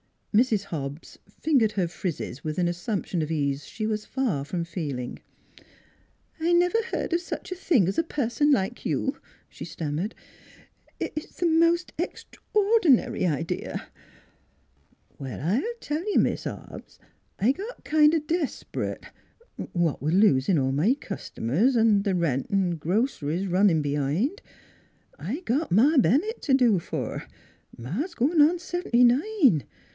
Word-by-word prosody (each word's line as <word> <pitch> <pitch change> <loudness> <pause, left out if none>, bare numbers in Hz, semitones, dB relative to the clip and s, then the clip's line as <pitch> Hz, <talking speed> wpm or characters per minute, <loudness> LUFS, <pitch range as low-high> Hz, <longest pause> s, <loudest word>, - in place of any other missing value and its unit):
Mrs. 220 -2 +3
Hobbs 145 -1 -6
fingered 250 -9 +1
her 185 -4 0
frizzes 165 -6 -5
with 155 -1 -4
an 180 -1 +2
as 175 - -3
sumption 180 -2 -2
of 155 - -3
ease 140 -3 -1
she 220 - -4
was 215 -1 -2
far 240 - -1
from 170 +4 -3
feeling. 145 -8 -5 0.6
" - - -36
I 335 +2 +1
never 355 +6 +3
heard - - -2
of 340 - +3
such 350 - -7
a - - -2
thing 300 - +2
as 195 - 0
a - - +3
person 290 -1 0
like 245 -4 0
you," 270 - -1 0.3
she - - -9
stammered. 160 +6 -4 0.4
" - - -31
It - - -2
it's 305 - -6
the 355 - -1
most 335 +1 +3
extraor 425 +3 0
dinary 260 - +3
idea 155 +2 -4 0.4
" - - -39
" - - -37
Well, 135 -2 -6
I'll 230 - 0
tell 300 +2 -2
you, - - +3
Mis' - - +1
Hobbs, - - -8 0.4
I 225 +6 +3
got 410 - -7
kind 300 0 +4
of 310 -2 -1
des'prit, 325 -2 -3 0.7
what 170 -4 0
with 155 +4 0
losin' 180 -4 +4
all 135 -1 +1
my 165 - +2
cust'mers, 200 - -1
'n' 220 -3 +4
th' 200 -3 0
rent 145 -7 0
'n' 185 -4 +1
groc'ries 180 - -1
runnin' 180 -4 +3
b'hind. 145 - -1 0.8
I 235 - -4
got 290 +1 -1
Ma 275 - +5
Ben 260 +3 +5
nett 440 +3 -6
t' 275 - 0
do 240 -8 +4
for; - - -5 0.5
Ma's 215 - -4
goin' 300 +6 +3
on 320 +4 +5
seventy 350 -8 +1
nine. 260 - +3
220 Hz, 155 wpm, -26 LUFS, -, 0.8 s, Ma